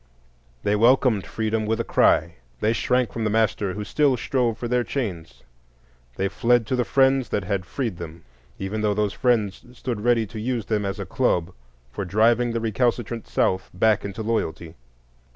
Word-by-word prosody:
They 105 - +2
welcomed 115 -2 +3
freedom 110 -1 -1
with 110 +1 0
a - - +1
cry. 85 -5 +2 0.2
They 110 +2 +2
shrank 125 +1 0
from 115 - -3
the 105 - +1
master 105 -3 +1
who 105 - -4
still 140 +4 +2
strove 120 -2 0
for 120 - -4
their 125 0 +1
chains; 100 - -5 0.7
they 95 - 0
fled 115 +4 +2
to 130 - -1
the 125 - +1
friends 135 -2 +2
that 105 - -1
had 95 -2 -2
freed 115 -8 -3
them, 85 0 -9 0.3
even 100 +3 -3
though 105 -1 +1
those 105 -1 0
friends 115 -7 0
stood 120 -3 -4
ready 115 -1 +2
to 110 +1 -8
use 115 -1 -2
them 105 -2 -1
as 95 - -3
a - - -4
club 90 +1 0 0.4
for 100 - -4
driving 115 +5 +2
the 115 - -1
recalcitrant 115 0 -1
South 95 0 0
back 105 +2 +3
into 100 +2 -5
loyalty. 85 -8 -2
110 Hz, 180 wpm, -24 LUFS, 100-120 Hz, 0.7 s, welcomed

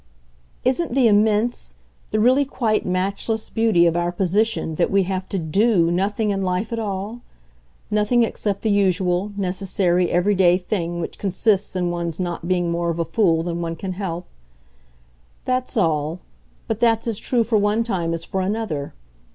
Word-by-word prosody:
"Isn't 260 +2 0
the 260 -3 +5
immense, 215 +2 +1 0.3
the 215 - 0
really 255 +6 +4
quite 235 -7 -1
matchless 200 +4 -2
beauty 220 -6 +3
of 170 -1 +2
our 175 0 0
position 190 0 0
that - - +2
we 195 0 +3
have 185 0 -3
to 195 - -2
'do' 175 +1 +2
nothing 205 +4 0
in 195 -1 -1
life 185 +4 -1
at 230 - -2
all? 210 +2 -4 0.7
nothing 210 +3 +3
except 205 -3 -2
the 220 - +2
usual, 190 -1 +1
necessary, 185 -2 0
everyday 180 0 +3
thing 175 -2 -3
which 165 - -5
consists 200 +1 +1
in 180 -1 0
one's 170 -1 -3
not 175 -2 -3
being 175 -2 +1
more 170 0 -1
of 165 - -2
a 170 - 0
fool 165 -2 +2
than 170 0 -3
one 165 -1 -3
can 185 +3 -5
help. 180 -2 -4 1.2
That's 255 0 -1
all 160 -3 0 0.5
but 220 -1 -2
that's 230 -1 +2
as 225 -3 -1
true 240 -2 +1
for 225 -1 +1
one 210 +3 +1
time 175 -7 -1
as 165 - -6
for 190 +2 -3
another. 190 -8 -3
195 Hz, 170 wpm, -22 LUFS, 175-220 Hz, 1.2 s, the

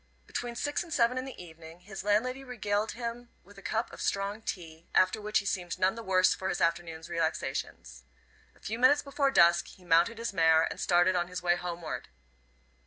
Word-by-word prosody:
Between 240 - -4
six 290 +4 -1
and 340 - -9
seven 250 -2 +2
in 255 - -5
the 270 - -9
evening 165 0 -12
his 195 +1 -8
landlady 250 +6 +1
regaled 215 -4 -2
him 235 0 -6
with 195 +2 -15
a - - -13
cup 225 +3 -2
of - - -9
strong 200 +2 -1
tea, 165 -5 -7
after 185 +3 +3
which 210 +1 0
he 205 - -1
seemed 180 -3 -2
none 185 +1 +2
the 230 - -7
worse 185 -3 +3
for 190 - -4
his 180 - -2
afternoon's 165 -1 -1
relaxations. 165 -2 -3 0.5
A - - -23
few 225 +2 -5
minutes 285 +4 +5
before 280 0 +1
dusk 170 -7 +5
he 185 - -15
mounted 175 +7 +3
his 230 -2 -4
mare 160 -3 +5
and - - -3
started 175 +1 +3
on 175 -1 0
his 180 0 -6
way 175 0 +3
homeward. 175 -2 -5
190 Hz, 200 wpm, -30 LUFS, 175-230 Hz, 0.5 s, minutes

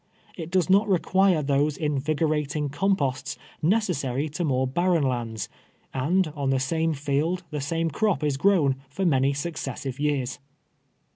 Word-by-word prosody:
It 165 -2 -6
does 180 -1 +2
not 200 +3 +4
require 185 -2 +3
those 145 +1 +1
invigorating 150 0 0
composts 145 -3 0 0.3
neces 195 -1 +2
sary 135 +2 -2
to 160 +4 -3
more 130 -4 +1
barren 170 +4 +1
lands, 115 -5 -2 0.5
and 170 +8 +1
on 145 -3 -3
the 135 -1 +2
same 160 +4 0
field 150 +6 -1
the 150 -1 -3
same 165 +3 -1
croj) 210 0 0
is 145 -2 +1
grown 150 -6 +3
for 190 +7 -2
many 135 -4 +3
successive 140 -3 -4
years. 145 -4 -1
150 Hz, 145 wpm, -25 LUFS, 135-175 Hz, 0.5 s, not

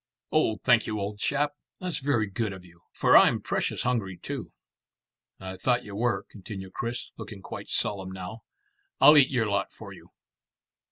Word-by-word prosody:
"Oh, 110 - +2
thank 120 -3 +4
you, 110 - -2
old 105 +1 -4
chap. 145 +5 +1 0.3
That's 180 -2 -2
very 135 -6 +1
good 105 +1 -2
of 95 -1 -11
you, 85 -1 -19
for - - +3
I'm - - +7
precious - - -2
hungry 110 -7 -1
too." - - -6 0.9
"I 95 0 -7
thought 125 +2 +1
you 100 -3 -8
were," 120 +3 0
continued 95 -2 -9
Chris, 120 +1 -4
looking 100 -3 -9
quite - - -8
solemn 95 -2 -1
now. 95 +4 -7 0.6
"I'll 150 - +9
eat 140 -3 +7
your 120 -4 +1
lot 100 -2 -1
for - - -11
you." - - -15
110 Hz, 170 wpm, -27 LUFS, 95-125 Hz, 0.9 s, I'll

